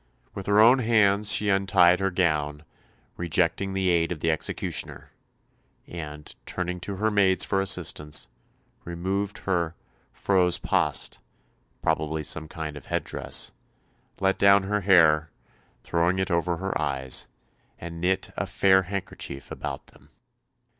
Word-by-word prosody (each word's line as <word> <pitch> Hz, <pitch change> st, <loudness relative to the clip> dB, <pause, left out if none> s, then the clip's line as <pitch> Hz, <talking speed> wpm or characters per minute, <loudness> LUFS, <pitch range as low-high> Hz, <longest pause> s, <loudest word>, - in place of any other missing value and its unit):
With 100 Hz, -, -7 dB
her 100 Hz, +1 st, +4 dB
own 120 Hz, +4 st, +7 dB
hands 105 Hz, -3 st, +3 dB
she 105 Hz, +1 st, +3 dB
untied 95 Hz, -2 st, +4 dB
her 95 Hz, 0 st, +1 dB
gown, 75 Hz, -5 st, -1 dB, 0.5 s
rejecting 85 Hz, +3 st, 0 dB
the 95 Hz, -1 st, +1 dB
aid 85 Hz, -1 st, +2 dB
of 85 Hz, -, -4 dB
the 80 Hz, +2 st, +1 dB
executioner, 80 Hz, -, -3 dB, 0.7 s
and, 75 Hz, -3 st, -8 dB
turning 90 Hz, 0 st, -3 dB
to 100 Hz, +3 st, -5 dB
her 110 Hz, +3 st, 0 dB
maids 95 Hz, -2 st, +3 dB
for 95 Hz, -, 0 dB
assistance, 75 Hz, -5 st, -1 dB, 0.6 s
removed 95 Hz, +4 st, -3 dB
her 85 Hz, -3 st, 0 dB, 0.4 s
"frose 90 Hz, -3 st, +2 dB
paast" -, -, 0 dB, 0.6 s
probably 80 Hz, -1 st, -1 dB
some 80 Hz, +1 st, -2 dB
kind 80 Hz, -2 st, -6 dB
of 75 Hz, -, -11 dB
head -, -, -1 dB
dress -, -, -1 dB, 0.7 s
let 95 Hz, 0 st, +1 dB
down 100 Hz, 0 st, +6 dB
her 105 Hz, +1 st, -1 dB
hair, 80 Hz, -4 st, +4 dB, 0.5 s
throwing 85 Hz, +2 st, +1 dB
it 95 Hz, -1 st, -1 dB
over 85 Hz, 0 st, 0 dB
her 95 Hz, +2 st, -3 dB
eyes, 65 Hz, -1 st, -1 dB, 0.5 s
and 85 Hz, 0 st, -8 dB
knit 95 Hz, +2 st, 0 dB
a -, -, -3 dB
"fair 95 Hz, -1 st, +4 dB
handkerchief" 90 Hz, -7 st, -5 dB
about -, -, -6 dB
them. -, -, -21 dB
90 Hz, 135 wpm, -26 LUFS, 80-95 Hz, 0.7 s, own